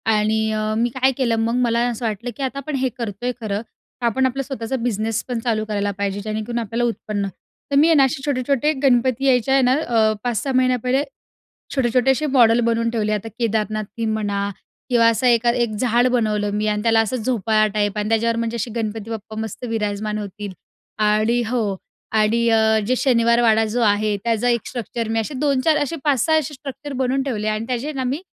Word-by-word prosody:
आणि 215 +1 +1
अ, 215 0 -1
मी 235 +2 +1
काय 260 +1 +3
केलं 240 -3 +2
मग, 230 +1 0
मला 230 0 +1
असं 235 0 -4
वाटलं, 220 +3 -3
की 275 - -3
आता 265 +1 -3
आपण 280 +2 -4
हे 260 - +1
करतोय 235 +1 -3
खरं. 210 -1 -2 0.4
तर 240 - -1
आपण 260 +3 +2
आपला 270 +1 -1
स्वतःचा 260 -2 -4
बिझनेस 220 -1 -1
पण 245 -2 -2
चालू 225 -2 -1
करायला 205 -1 -1
पाहिजे 200 0 -2
जेणेकरून 215 +3 -3
आपल्याला 230 +1 -2
उत्पन्न 210 -3 -3 0.4
तर - - +1
मी 310 - +5
आहे 330 - +5
ना, 280 - +6
असे 270 +1 -2
छोटे-छोटे 280 +1 +1
गणपती 255 0 +2
यायच्या 260 0 +3
आहे 270 - +5
ना 250 +1 +4
अ, 230 -7 +2
5-6 245 +3 -1
महिन्या 255 -1 +3
पहिले 260 +3 +1 0.7
छोटे 265 -3 +2
छोटेसे 265 +4 +3
मॉडल 230 -1 +6
बनवून 230 0 +1
ठेवले. 215 -2 -1
आता 210 +1 -2
केदारनाथ 215 -2 -1
थीम 225 -1 0
म्हणा 200 -2 -1 0.4
किंवा 235 -2 +4
असं 230 +3 +1
एका 240 -1 +4
एक 235 - -4
झाड 245 0 +3
बनवलं 210 -3 +1
मी 210 +1 -1
आणि 210 0 0
त्याला 225 0 +4
असं 225 +3 0
झोपाळा 220 -2 +1
टाईप 205 0 0
आणि 210 0 -1
त्याच्यावर 230 +1 +1
म्हणजे 230 0 -2
असे 230 +1 -3
गणपती 220 -1 -3
बाप्पा 215 -1 -6
मस्त 220 +2 -6
विराजमान 210 -1 -2
होतील. 205 0 -6 0.5
आणि 215 +3 +2
हो. 245 +1 0 0.6
आणि 220 +2 +2
अ, 220 0 +4
जे 255 - +1
शनिवार 235 -2 +3
वाडा 225 -1 +4
जो 245 - +1
आहे 210 -1 +2
त्याचा 230 +1 +1
एक 235 -2 0
स्ट्रक्चर 235 -1 -4
मी 225 0 0
असे 225 +6 -5
2-4 290 +2 +2
असे 320 +3 -3
5-6 295 +2 +3
असे 300 -1 -4
स्ट्रक्चर 275 +1 -8
बनवून 260 +2 +1
ठेवले. 220 -6 -2
आणि 215 +1 -2
त्याचे 255 +5 -2
ना 265 -3 -3
मी 270 +7 -2
230 Hz, 205 wpm, -21 LUFS, 215-255 Hz, 0.7 s, ना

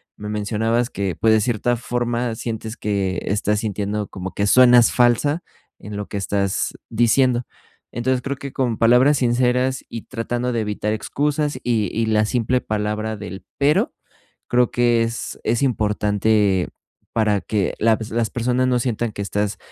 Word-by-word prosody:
Me 105 0 -7
mencionabas 110 +3 0
que, 95 -3 -3
pues, 110 0 +4
de 110 - +4
cierta 120 +1 0
forma 120 0 -2
sientes 110 0 -5
que 95 -3 -1
estás 105 +1 0
sintiendo 105 -1 -2
como 95 0 -6
que 100 - 0
suenas 125 +1 +6
falsa 130 +7 +3 0.4
en 105 0 -7
lo 105 - -5
que - - -8
estás 100 0 -1 0.2
diciendo. 120 +2 +3 0.5
Entonces 125 +2 0
creo 140 +1 -4
que 140 -1 -8
con 120 -4 -1
palabras 125 +5 +5
sinceras 125 +1 +1
y 115 - -6
tratando 120 0 -3
de 115 - 0
evitar 105 0 -2
excusas 145 +4 -1
y 110 -5 +1
y 115 0 0
la 110 -1 +3
simple 125 +2 0
palabra 110 0 -2
del 100 -1 -8
"pero", 145 +2 +2 0.5
creo 125 -1 +2
que 120 -1 +3
es 115 +1 -4
es 115 +3 0
importante 105 -4 +1 0.5
para 105 -3 +2
que 105 -4 -1
laps 110 0 +1
las 115 -1 0
personas 125 +2 0
no 125 -1 +2
sientan 120 -2 -1
que 100 - -6
estás 105 0 -2
115 Hz, 160 wpm, -21 LUFS, 105-125 Hz, 0.5 s, suenas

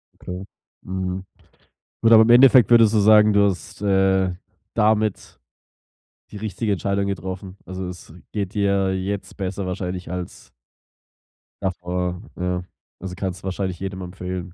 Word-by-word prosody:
Okay. 90 +1 -7 0.4
Mhm. 95 0 -3 0.8
Gut, 115 - +4
aber 110 -1 +9
im 110 - +1
Endeffekt 125 -1 +7
würdest 115 -2 +6
du 110 - +4
sagen, 105 0 +6
du 100 0 +5
hast, 90 -1 -7
äh, 95 -2 +2 0.4
damit 110 -1 0 0.9
die - - -8
richtige 105 +1 -2
Entscheidung 100 +2 -1
getroffen. 95 0 -5
Also, 95 0 -5
es 90 -3 -10 0.2
geht 100 -2 -3
dir 100 -2 +1
jetzt 95 +1 -4
besser 95 0 -3
wahrscheinlich 90 -1 -4
als 90 -1 -7 1.1
davor, 90 -1 -3
ja. 90 0 -2 0.4
Also, 90 -1 -6
kannst 95 -1 -4
du - - -34
wahrscheinlich 95 -2 -3
jedem 95 -1 -5
empfehlen. 90 0 -6
95 Hz, 135 wpm, -22 LUFS, 90-100 Hz, 1.1 s, aber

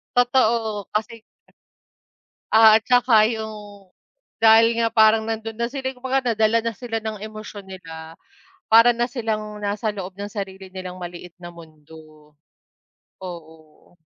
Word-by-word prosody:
Totoo, 235 -4 +1
kasi 225 +1 -3 1.3
Ah, 220 0 +7
at 225 - -30
saka 245 -3 +4
yung 210 -4 -7 0.5
dahil 225 +1 +5
nga 230 - +2
parang 220 0 +3
nando'n 225 0 -5
na 235 - 0
sila 260 +1 -4
kumbaga 260 -1 -1
nadala 220 +1 +2
na 230 - -1
sila 230 0 -4
ng 215 -2 -5
emosyon 215 -2 -9
nila. 165 -4 -10 0.6
Para 230 +2 +7
na 240 +1 -1
silang 215 -3 -4
nasa 205 +2 -2
loob 195 -2 -7
ng 200 +1 -6
sarili 195 -2 -7
nilang 185 -1 -7
maliit 175 0 -9
na 175 - -7
mundo, 155 -2 -16 0.9
oo. 160 -1 -12
215 Hz, 130 wpm, -22 LUFS, 185-230 Hz, 1.3 s, Ah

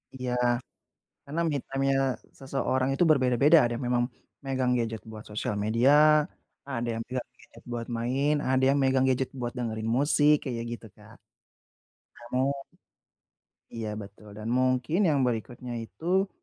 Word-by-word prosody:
Iya. 125 -1 -3 0.9
Karena 150 +4 -3
me 150 - 0
time-nya 135 0 +1 0.4
seseorang 135 -1 -1
itu 175 - +3
berbeda-beda, 135 +2 +5
ada 120 -2 +1
yang 125 - -5
memang 120 0 +2 0.4
megang 130 -2 +1
gadget 115 -3 -3
buat 110 -1 -9
sosial 105 0 -2
media, 115 +5 +3 0.8
ada 120 -3 -2
yang 115 - -3
pegang 125 0 -4
gadget - - -17
buat 120 -1 -3
main, 135 +5 +1 0.2
ada 130 0 +2
yang 140 +1 +3
megang 130 0 +3
gadget 130 0 0
buat 120 0 -3
dengerin 110 -2 -3
musik, 145 +1 +4
kayak 120 -3 -3
gitu, 120 -1 -7
Kak. - - -16 1.2
Namun 135 +2 0 1.1
Iya 115 -2 -4
betul, 105 +1 -12
dan 110 +1 -6
mungkin 130 +7 +1
yang 145 -3 +2
berikutnya 120 +1 -3
itu, 180 - 0
130 Hz, 145 wpm, -28 LUFS, 115-135 Hz, 1.2 s, berbeda-beda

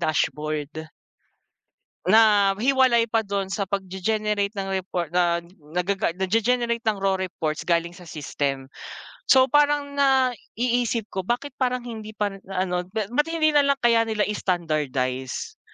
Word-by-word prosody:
dashboard. 155 -1 -1 1.3
Na 205 -1 +5
hiwalay 255 -3 +3
pa 225 -1 +1
dun 200 -1 -2
sa 200 0 -2
pagge-generate 200 +2 -1
ng 195 -2 -4
report 185 -3 -2
na 175 0 +2 0.3
nagaga 180 0 0
nagge-generate 230 +5 0
ng 210 -3 0
raw 195 -1 +2
reports 170 -5 -3
galing 170 0 0
sa 180 - -13
system. 140 -4 -3 0.6
So 260 -1 +7
parang 290 -1 +2
naiisip 245 -4 +1
ko, 190 - -3
bakit 245 +4 -1
parang 250 -1 0
hindi 220 -3 -8
pa 205 -1 -1 0.2
ano, 180 -2 -2
ba't 235 +8 0
hindi 320 -2 +2
nalang 280 -1 +4
kaya 230 -1 +4
nila 215 -1 0
standardize, 155 - -2
205 Hz, 125 wpm, -24 LUFS, 180-240 Hz, 1.3 s, So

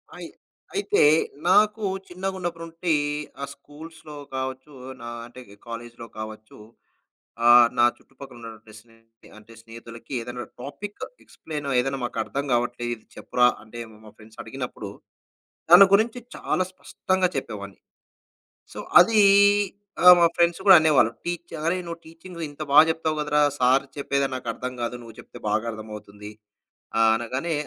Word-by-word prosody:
అయి - - -8 0.5
అయితే 410 +1 +1 0.5
నాకు 210 +3 +3 0.2
చిన్నగున్నప్పటి 180 -2 -5
నుంటి, 165 0 -2 0.5
ఆ - - -3
స్కూల్స్‌లో 155 +2 -13 0.2
కావచ్చు, 130 +2 -5 0.3
నా 120 - -7 0.2
అంటే 120 +2 -13
ఇక 100 - -16
కాలేజ్‌లో 115 0 -8
కావచ్చు, 110 0 -9 0.9
ఆహ్, 120 0 +8
నా 120 - +6
చుట్టుపక్కల 135 -1 -14
ఉన్నటువంటి 110 -2 -12
స్నేహితులకి 115 0 -24
అంటే 110 +1 -17
స్నేహితులకి 115 +1 -12
ఏదన్నా 120 +1 -7 0.2
టాపిక్, 200 +10 -8 0.2
ఎక్స్‌ప్లెయిన్ 150 -2 -8
చేయమని, 125 -2 +3
"ఇది 135 +1 -3
మాకర్థం 120 +4 -3
కావట్లే, 120 0 -1
ఇది 110 - -20
చెప్పురా," 125 0 +2 0.2
అంటే 110 +2 -12
మా 105 - -17
మా 105 - -12
ఫ్రెండ్స్ 110 0 -15
అడిగినప్పుడు, - - -7 0.8
దాని 180 +3 +10
గురించి 225 +4 +2 0.2
చాలా 185 - -1
స్పష్టంగా 185 0 -1
చెప్పేవాడ్ని. - - -6 0.9
సో, - - -8 0.2
అది 220 -2 +4 0.8
ఆ! - - +6
మా 170 - +6
ఫ్రెండ్స్ 170 0 +3
కూడా 190 - +10
అనేవాళ్ళు. 150 -8 +3
టీచ్ 175 0 -5
"అరేయ్! 180 +2 0
నువ్వు 170 0 -7
టీచింగు 170 +1 -11
ఇంత 145 +1 -12
బా 145 - +8
జెప్తావు 160 -1 -1
కదరా! 150 0 +1 0.2
సార్ 130 +2 +3
చెప్పేదే 140 -1 0
నాకర్థం 125 +1 -5
కాదు. 120 +1 -3
నువ్వు 115 -2 -13
చెప్తే - - -13
బాగా 110 +2 0
అర్థమవుతుంది" 105 -1 -10 0.7
ఆహ్, 115 0 +5
అనగానే 130 +8 -3
130 Hz, 140 wpm, -24 LUFS, 115-170 Hz, 0.9 s, దాని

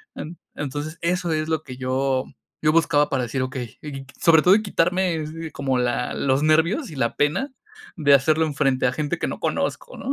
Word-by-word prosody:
En 165 +2 -7 0.2
entonces, 145 +3 -4
eso 175 0 0
es 155 0 -1
lo 160 -1 0
que 130 -3 -9
yo 130 0 0 0.4
yo 155 - +4
buscaba 150 -3 +3
para 130 -2 0
decir, 130 +2 -2
okey, 130 -3 -6
y 150 - -7
qui 135 -1 -7
qui 130 - -18
sobre 160 -2 +6
todo 185 +4 +6
y 215 - +1
quitarme 180 -1 +1
es 155 0 -4 0.2
como 135 -2 -1
la 125 0 -1
los 135 +1 +1
nervios 165 - +2
y - - -9
la 120 -3 -1
pena 185 - 0 0.4
de 145 -3 +4
hacerlo 155 +4 +3
enfrente 135 -3 +1
a - - +1
gente 155 +3 -2
que - - -1
no - - -5
conozco, - - -2
¿no? 270 - -4
150 Hz, 215 wpm, -23 LUFS, 135-165 Hz, 0.4 s, sobre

